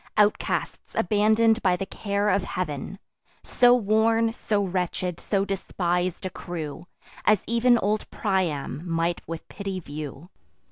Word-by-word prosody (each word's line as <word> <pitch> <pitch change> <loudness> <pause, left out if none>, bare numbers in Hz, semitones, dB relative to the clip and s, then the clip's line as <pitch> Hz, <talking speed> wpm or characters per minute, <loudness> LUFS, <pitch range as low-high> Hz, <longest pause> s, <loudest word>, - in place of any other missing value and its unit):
Outcasts, 210 0 0
abandon'd 220 +3 +3
by 185 -2 +3
the 195 - -3
care 200 +1 -1
of 195 -1 +2
Heav'n; 180 0 -4 0.5
So 245 -1 +5
worn, 225 0 +2
so 210 -3 0
wretched, 180 -1 -2
so 195 -1 0
despis'd 180 -2 -1
a 185 - -3
crew, 165 -2 -6 0.4
As 210 -3 +3
ev'n 235 +1 +4
old 210 0 -1
Priam 180 -9 -1
might 170 0 -1
with 165 -1 -6
pity 195 -2 -5
view. 150 0 -8
195 Hz, 130 wpm, -25 LUFS, 175-215 Hz, 0.5 s, So